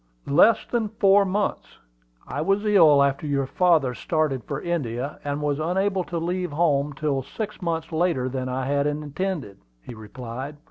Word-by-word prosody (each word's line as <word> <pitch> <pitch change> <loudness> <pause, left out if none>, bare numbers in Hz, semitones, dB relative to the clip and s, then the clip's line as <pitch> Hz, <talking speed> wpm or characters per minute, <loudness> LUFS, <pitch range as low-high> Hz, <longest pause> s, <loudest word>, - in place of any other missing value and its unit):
"Less 175 +10 +4
than 230 -3 -1
four 200 -2 +4
months. 200 +2 -2 0.5
I - - -3
was 195 +5 +1
ill 160 -9 +6
after 140 +2 -1
your 140 -1 0
father 160 -4 +2
started 150 -2 -1
for 140 - -4
India, 140 -5 -3
and 145 +1 -3
was 145 0 0
unable 190 +4 0
to 170 - -4
leave 175 +1 -2
home 145 -3 +1
till 140 -1 -1
six 210 - -6
months 165 -2 -3
later 160 -6 0
than 130 0 -3
I 130 +1 -2
had 140 +1 +1
intended," 150 - -4 0.2
he - - -9
replied. 125 +5 -8
150 Hz, 165 wpm, -24 LUFS, 140-180 Hz, 0.5 s, ill